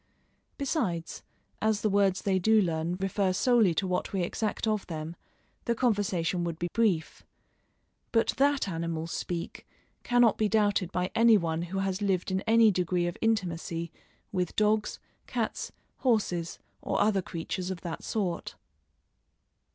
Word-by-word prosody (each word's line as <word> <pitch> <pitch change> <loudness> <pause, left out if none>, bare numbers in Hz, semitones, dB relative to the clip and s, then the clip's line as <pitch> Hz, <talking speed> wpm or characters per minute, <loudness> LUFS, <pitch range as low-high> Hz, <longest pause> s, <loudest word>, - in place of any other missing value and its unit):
Besides, 230 - -2 0.4
as 215 -1 +1
the - - +2
words 195 -2 +2
they 190 -2 +2
do 220 +4 +4
learn 170 -2 0
refer 195 0 0
solely 220 -4 +3
to 195 - 0
what 180 -1 -1
we 190 -3 0
exact 215 +6 -2
of 215 -2 -1
them, 160 0 -5 0.5
the 235 - +1
conversation 200 -7 0
would 170 -2 -3
be 175 +1 -3
brief. 200 -9 +1 0.9
But 225 -1 +2
that 280 -3 +2
animals 165 -2 -3
speak 170 -1 -5 0.3
cannot 245 -3 +3
be 215 -1 +2
doubted 205 -4 +2
by 180 0 -1
any 230 -1 +6
one 165 -3 -1
who 175 +3 -4
has 195 0 -1
lived 190 -2 0
in 190 0 0
any 225 -1 +6
degree 180 -1 0
of 175 - -2
intimacy 170 -6 -1 0.4
with 180 -3 -2
dogs, 215 0 +1 0.3
cats, - - -3 0.3
horses, 200 -9 0 0.2
or - - -1
other 205 -1 +3
creatures 180 +2 -4
of 185 -2 -5
that 170 -2 -6
sort. 190 -6 -2
190 Hz, 145 wpm, -29 LUFS, 175-215 Hz, 0.9 s, any